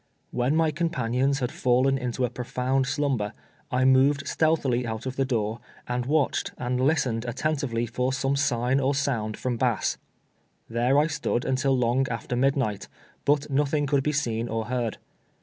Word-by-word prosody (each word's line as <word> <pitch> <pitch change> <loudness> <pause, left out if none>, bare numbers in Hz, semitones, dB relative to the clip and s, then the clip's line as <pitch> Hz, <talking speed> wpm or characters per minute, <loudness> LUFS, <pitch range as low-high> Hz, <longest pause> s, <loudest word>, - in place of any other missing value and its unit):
"Wlien 125 +3 +1
my 160 -1 +3
companions 135 -4 0
had 125 - -1
fallen 130 +2 +2
into 125 -1 -1
a 125 - -4
i)rofound 125 +1 -1
slumber, 130 -7 -1 0.4
I 125 0 +1
moved 135 +2 +4
stealtiiily 145 -7 +1
out 110 0 -4
of 130 0 -4
the 135 - +1
door, 115 -3 -1 0.3
and 125 0 -2
watch 150 -1 +1
ed, - - -10
and 125 0 -1
listened 130 -5 +1
attentively 125 -2 -1
for 125 +3 -1
some 135 +1 0
sig 125 -3 0
n 135 - +4
or 140 +1 +1
sound 115 -7 -1
from 125 -2 -2
Bass. - - 0 0.7
Tliere 125 +5 +3
I - - +1
stood 150 -5 -1
until 130 0 +1
long 125 +2 +2
after 120 +1 -3
midnight, 130 -5 0 0.4
but 145 0 +2
nothing 145 +1 +1
could 140 -1 +2
be 150 - 0
seen 120 -5 -1
or 115 0 -2
heard. 120 -1 -2
130 Hz, 170 wpm, -26 LUFS, 120-140 Hz, 0.7 s, moved